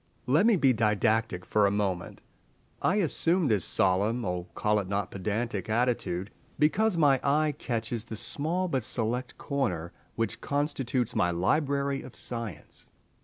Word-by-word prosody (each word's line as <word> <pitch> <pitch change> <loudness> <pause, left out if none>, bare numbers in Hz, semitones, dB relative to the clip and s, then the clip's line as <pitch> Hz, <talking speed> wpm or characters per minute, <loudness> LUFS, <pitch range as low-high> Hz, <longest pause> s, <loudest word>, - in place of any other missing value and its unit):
Let 150 - +4
me 230 - +5
be 135 -7 +4
didactic 110 -3 +1
for 105 0 +3
a - - +3
moment! 100 -3 -2 0.6
I 185 - +2
assume 170 -3 +1
this 105 -4 +2
solemn—oh, 95 -1 0
call 105 0 +2
it 100 - -4
not 100 -1 -2
pedantic!—attitude 110 -1 -1 0.3
because 180 +7 +2
my 140 -4 +4
eye 150 +2 +2
catches 115 -1 -3
the 115 - -6
small 155 - -1
but 135 -8 -1
select 120 +2 -1
corner 100 - -2 0.2
which 115 0 -2
constitutes 130 -4 -1
my 90 - +2
library 140 - 0
of 130 - -11
Science. 115 -10 -5
115 Hz, 135 wpm, -28 LUFS, 100-140 Hz, 0.6 s, me